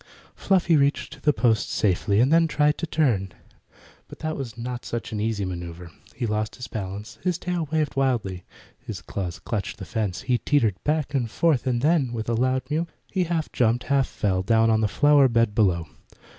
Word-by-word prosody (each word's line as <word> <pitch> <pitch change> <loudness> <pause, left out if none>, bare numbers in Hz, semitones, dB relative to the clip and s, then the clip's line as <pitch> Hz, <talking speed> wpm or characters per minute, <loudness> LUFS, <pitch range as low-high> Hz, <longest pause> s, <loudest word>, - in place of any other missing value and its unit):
Fluffy 180 -3 +2
reached 140 -1 0
the 150 - +4
post 115 -6 +1
safely, 100 +1 +1
and 130 +6 +4
then 165 0 +5
tried 150 -1 +2
to 170 - -2
turn. 115 - +1 0.7
But - - -11
that 155 0 -3
was 120 -5 -6
not 120 +1 -5
such 120 -1 -5
an 110 - -3
easy 105 -2 -1
matter. 85 -1 -7 0.2
He - - -2
lost 110 0 -2
his 125 0 -7
balance. 105 +2 -6
His 180 -3 0
tail 175 -4 -3
waved 155 -2 0
wildly. 115 -10 0 0.4
His - - -7
claws 90 -3 -5
clutched 100 0 -4
the - - -7
fence. 100 -5 -2
He 125 -2 0
teetered 115 -10 +1
back 150 -1 0
and 125 -5 0
forth, 140 0 +1
and 120 -1 0
then, 150 -6 +2
with 110 -2 -4
a - - +1
loud 130 +2 +1
mew, 165 +3 0 0.2
he 185 -2 +1
half 165 -2 -2
jumped, 120 0 +1
half 135 -1 +3
fell, 95 -3 -1
down 115 +3 +3
on 110 0 +2
the 110 - +3
flower 145 +4 +5
bed 115 -3 +2
below. 90 -7 +2
120 Hz, 195 wpm, -24 LUFS, 105-150 Hz, 0.7 s, then